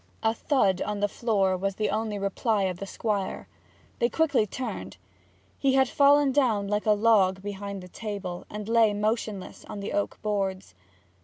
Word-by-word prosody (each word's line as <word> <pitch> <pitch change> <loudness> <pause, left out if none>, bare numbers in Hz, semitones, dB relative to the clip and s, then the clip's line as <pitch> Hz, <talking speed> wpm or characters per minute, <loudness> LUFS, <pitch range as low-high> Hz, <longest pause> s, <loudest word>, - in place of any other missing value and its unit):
A 220 0 +3
thud 225 - +1
on 210 -1 -2
the 205 - +2
floor 200 -3 +1
was 195 +1 -2
the 215 - -1
only 215 0 -1
reply 200 +2 0
of 185 -2 -2
the 195 - -5
Squire. 200 -2 -3 0.5
They 235 - +2
quickly 285 -9 +2
turned. 195 - -5 0.6
He 270 -1 +2
had 265 -1 +4
fallen 285 +1 +4
down 235 -8 +2
like 210 +1 -1
a 210 - +6
log 205 -3 +3
behind 200 -1 -5
the - - -10
table, 195 -3 -5
and 210 0 -6
lay 225 -2 +4
motionless 215 -2 -2
on 210 - -7
the 200 - -5
oak 205 - -1
boards. 195 - -2
210 Hz, 170 wpm, -27 LUFS, 195-225 Hz, 0.6 s, a